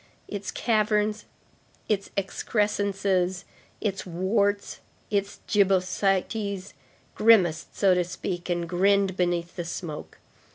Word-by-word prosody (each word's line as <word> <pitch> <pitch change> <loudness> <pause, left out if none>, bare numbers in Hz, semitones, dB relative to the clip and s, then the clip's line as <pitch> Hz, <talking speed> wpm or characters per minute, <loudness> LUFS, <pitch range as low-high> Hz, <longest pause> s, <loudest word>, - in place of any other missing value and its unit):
Its 205 -1 -5
caverns, 215 -1 +1 0.6
its 200 -2 0
excrescences, 195 -2 0 0.4
its 195 -3 -2
warts, 200 +3 0 0.3
its 200 -1 -1
gibbosities, 195 0 +1 0.4
grimaced, 190 -8 +3
so 195 -2 +5
to 180 0 +2
speak, 175 0 -5
and 175 -1 -1
grinned 195 +2 +2
beneath 175 -1 -1
the 175 - -3
smoke. 165 -2 -6
195 Hz, 95 wpm, -26 LUFS, 180-205 Hz, 0.6 s, so